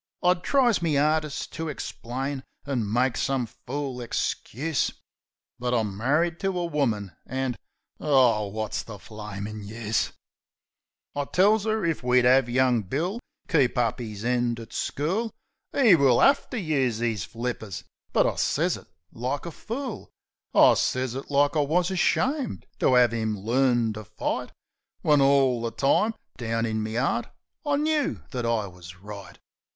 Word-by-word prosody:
I 180 0 +6
tries 240 +5 +2
me 160 -4 +1
'ardest 155 0 0
to 165 -1 -3
ixplain, 135 0 -4 0.2
an' 120 -7 -1
made 125 +2 +2
some 135 -2 0
fool 135 +3 -5
ixcuse; 135 +4 -1 0.7
But 125 0 0
I'm 105 -4 0
marri'd 155 - +1
to 195 -2 -1
a 175 - 0
woman, 115 - -1 0.2
an' 130 -1 -2 0.4
Aw, 125 -8 +3
wot's 110 +1 -3
the 110 -2 -9
flamin' 105 0 -7
use? 110 +1 -1 1.0
I 145 0 -1
tells 205 +7 +3
'er 215 -3 +1
if 165 -2 0
we'd 125 0 +3
'ave 125 -1 +5
young 125 -2 +3
Bill 160 - -2 0.3
keep 140 -8 +2
up 120 0 +1
'is 110 -2 -6
end 120 -1 +1
at 115 -1 -10
school 190 +11 -1 0.4
'E 235 -8 +7
will 135 -7 +5
'ave 275 +1 +4
to 250 - -3
use 135 - 0
'is 115 -5 -1
flippers; 115 -7 -5 0.3
but - - +3
I - - 0
sez - - +1
it - - -15 0.2
like 130 +6 -3
a 170 - -5
fool. 240 - -6 0.4
I - - +7
sez 130 -1 0
it 135 +2 -6
like 145 +2 +3
I 150 - +4
wus 175 +5 +1
ashamed 260 - 0
to 130 - +4
'ave 115 -2 +4
'im 110 -1 -1
learn 120 +1 +2
to 110 0 -8
fight, 105 +1 -3 0.5
When 150 -2 +5
all 135 -3 +4
the 115 - -1
time, 140 - +2 0.2
down 115 -1 -1
in 110 -1 -1
me 110 +1 -3
'eart, 125 - 0 0.4
I 290 -2 +1
knoo 300 0 0
that 125 -4 -2
I 115 -3 +1
wus 90 -2 -11
right. 100 +2 -10
130 Hz, 155 wpm, -26 LUFS, 115-155 Hz, 1.0 s, E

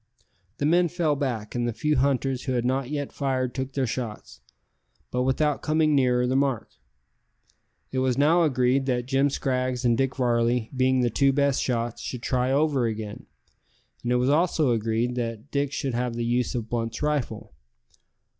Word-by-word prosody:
The 145 - -1
men 175 +3 +4
fell 165 -3 0
back, 120 -7 -3
and 120 -1 -1
the 120 - -2
few 150 +6 0
hunters 135 -1 0
who 130 - -1
had 120 -1 0
not 130 0 0
yet 145 -2 -3
fired 130 -3 -1
took 130 0 -4
their 135 -1 0
shots, 115 -2 -5 0.7
but 125 - 0
without 140 +3 +1
coming 155 0 +2
nearer 125 -3 +3
the 130 +1 0
mark. 135 -4 0 1.2
It 130 - -1
was 130 -1 +1
now 155 +5 +4
agreed 130 -3 +2
that 125 -2 0
Jim 135 +2 +2
Scraggs 130 -2 -1
and 120 -1 +4
Dick 135 +2 0
Varley, 120 -2 +1
being 130 0 +2
the 120 -1 +1
two 135 +4 +3
best 140 -1 +1
shots, 120 -2 -2
should 125 -2 -6
try 125 0 0
over 140 -3 +2
again, 110 -2 -6 0.7
and 120 - -2
it - - +3
was 125 +2 +2
also 155 -3 +2
agreed 115 +2 0
that 115 +2 -4
Dick 140 -1 0
should 135 -2 -2
have 120 0 -1
the 120 0 -2
use 120 +1 0
of 115 -2 -3
Blunt's 115 +2 -3
rifle. 135 - -2
130 Hz, 180 wpm, -25 LUFS, 120-140 Hz, 1.2 s, men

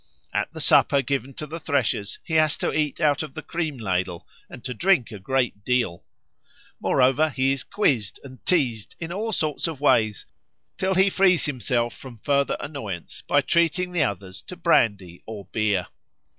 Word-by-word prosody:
At - - -1
the - - -7
supper 140 -1 +4
given 135 0 -2
to 150 - -5
the 160 +3 -6
threshers 130 -9 -1
he 160 - -7
has 155 -1 +3
to - - -1
eat 150 -2 -1
out 150 -3 +2
of 155 -3 -7
the - - -6
cream 160 -5 -3
ladle 95 -5 -2 0.2
and 120 - -11
to 125 - -3
drink 170 - +2
a 105 - -7
great 120 -1 -1
deal. 120 -9 0 0.8
Moreover, 135 +4 +3
he 135 -1 +1
is 135 - -1
quizzed 125 - 0
and 130 -2 -12
teased 125 - 0
in 170 +1 -5
all 220 +4 -2
sorts 155 -4 -1
of 160 -5 -5
ways 115 -7 +2 0.5
till 190 0 0
he 190 +1 +4
frees 185 -4 +4
himself 120 -4 -1
from 130 -3 -11
further 140 +5 +1
annoyance 110 - -6
by 145 - +4
treating 170 +4 +1
the 175 -3 0
others 100 -7 -3
to 180 - -7
brandy 100 - +1
or 105 -3 -7
beer. 105 -5 +1
135 Hz, 175 wpm, -24 LUFS, 110-155 Hz, 0.8 s, supper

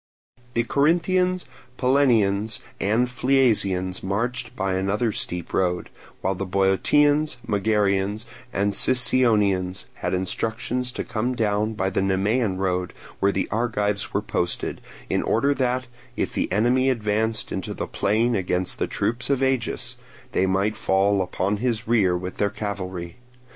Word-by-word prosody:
The 120 - +3
Corinthians, 175 +7 +2 0.3
Pellenians, 115 -6 +2 0.2
and 110 +5 +2
Phliasians 110 -8 +1
marched 120 +5 -2
by 95 -1 -1
another 100 +5 0
steep 90 -4 -4
road; 90 -1 0 0.3
while 95 - 0
the 95 - -4
Boeotians, 135 +11 +2
Megarians, 105 0 +1 0.3
and 100 -2 0
Sicyonians 105 -7 +2
had - - -2
instructions 115 +6 -2
to - - -3
come 120 +3 -2
down 105 -1 0
by 95 -2 -1
the 95 - 0
Nemean 95 +2 +1
road 90 -1 -1 0.3
where 100 - +3
the 95 - -1
Argives 105 -2 -1
were - - -1
posted, 90 0 -2 0.3
in - - 0
order 140 +6 +2
that, 130 -1 0 0.3
if - - -1
the - - -1
enemy 120 +6 +3
advanced 110 -2 0
into - - -4
the - - -3
plain 110 +4 +1
against 90 -3 -1
the - - 0
troops 120 +4 -1
of 135 -1 +2
Agis, 130 -3 -1 0.3
they 95 - +1
might 100 +3 +1
fall 100 0 +2
upon 95 +2 -1
his 115 0 -1
rear 100 -7 +3
with 90 +1 -6
their 100 - +1
cavalry. 95 -3 -5
105 Hz, 140 wpm, -24 LUFS, 95-125 Hz, 0.3 s, The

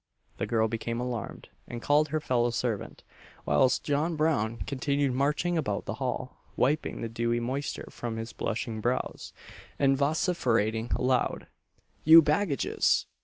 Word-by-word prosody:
The - - -2
girl 110 -1 +2
became 115 +1 -3
alarmed, 125 -3 -5 0.2
and 120 - -6
called 145 +5 +3
her 155 0 -1
fellow 120 -5 +1
servant; 115 -3 -3 0.4
whilst 75 - +3
John 155 +3 0
Brown 140 -8 +1
continued 140 0 0
marching 150 +6 +1
about 105 -9 -2
the - - -3
hall, - - -3 0.2
wiping 150 +5 0
the 115 - -2
dewy 115 +1 -1
moisture 130 +4 -3
from 115 -2 -5
his 115 +1 -6
blushing 115 -1 -3
brows, 120 +3 -2 0.5
and 135 -1 +3
vociferating 125 - +1
aloud, 125 0 0 0.6
"You 160 +1 +9
baggages! 150 0 +1
125 Hz, 135 wpm, -28 LUFS, 115-145 Hz, 0.6 s, You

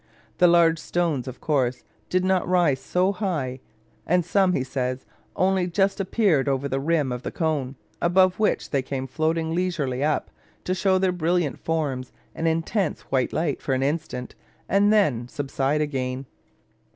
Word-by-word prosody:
The 180 - +7
large 170 -1 +4
stones, 160 -7 -1
of 130 - -7
course, 130 -5 0 0.3
did 185 0 +1
not 190 -1 +1
rise 175 -7 +3
so 180 +6 +1
high; 165 -11 -2 0.5
and 180 0 +2
some, 185 +1 +3
he 130 - 0
says, 130 0 -3 0.3
"only 185 -1 +2
just 195 +3 +1
appeared 190 -8 +2
over 135 +1 0
the 135 0 -1
rim 150 -2 +1
of 125 0 -4
the - - -4
cone, 145 -5 -2 0.3
above 185 +2 +3
which 215 - 0
they 140 - +2
came 130 0 -4
floating 160 +3 -1
leisurely 160 -8 -1
up, 150 0 0 0.3
to 185 - -1
show 190 0 +2
their 185 0 +2
brilliant 175 -3 0
forms 145 -6 -2 0.2
and 165 - -2
intense 165 +3 0
white 130 -2 +1
light 155 -4 -1
for 135 - 0
an 130 - 0
instant, 140 -4 -3 0.3
and 200 +2 +3
then 145 - +2
subside 140 +2 -1
again." 130 -3 -2
160 Hz, 165 wpm, -24 LUFS, 135-180 Hz, 0.5 s, The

